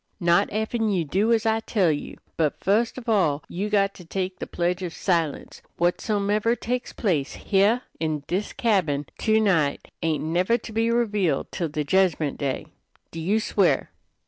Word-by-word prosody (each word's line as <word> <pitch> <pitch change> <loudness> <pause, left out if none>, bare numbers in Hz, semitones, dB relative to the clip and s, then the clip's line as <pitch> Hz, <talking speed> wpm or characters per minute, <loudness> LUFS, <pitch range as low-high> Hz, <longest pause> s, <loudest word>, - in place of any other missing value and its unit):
"Not 170 -2 +3
effen 220 +1 -1
you 180 -5 0
do 200 +9 +1
as 230 0 +2
I 220 0 +2
tell 200 -6 +1
you. 145 - -5 0.2
But 155 -3 0
fust 220 +6 +1
of 250 -1 -8
all 170 -10 +2
you 200 +4 -3
got 200 -1 +2
to 180 - -12
take 185 +2 -4
the - - -5
pledge 180 +2 -1
of 175 -3 -5
silence. 165 -6 -1 0.2
Whatsomever 205 +5 +1
takes 245 +1 -3
place 160 - -1
heah 210 +5 +2 0.2
in 155 -3 -2
this 190 +4 -2
cabin 175 -11 +1
to 220 0 +3
night 165 -10 +1
ain't 160 -3 0
never 180 +8 +2
to 230 - -10
be 225 +1 +1
revealed 210 - 0
till 170 -3 -2
the 150 0 -2
jedgment 165 -3 +1
day. 140 -2 -2 0.5
Do 165 - -6
you 195 +7 +1
swear?" 220 - +1
190 Hz, 170 wpm, -25 LUFS, 165-220 Hz, 0.5 s, Not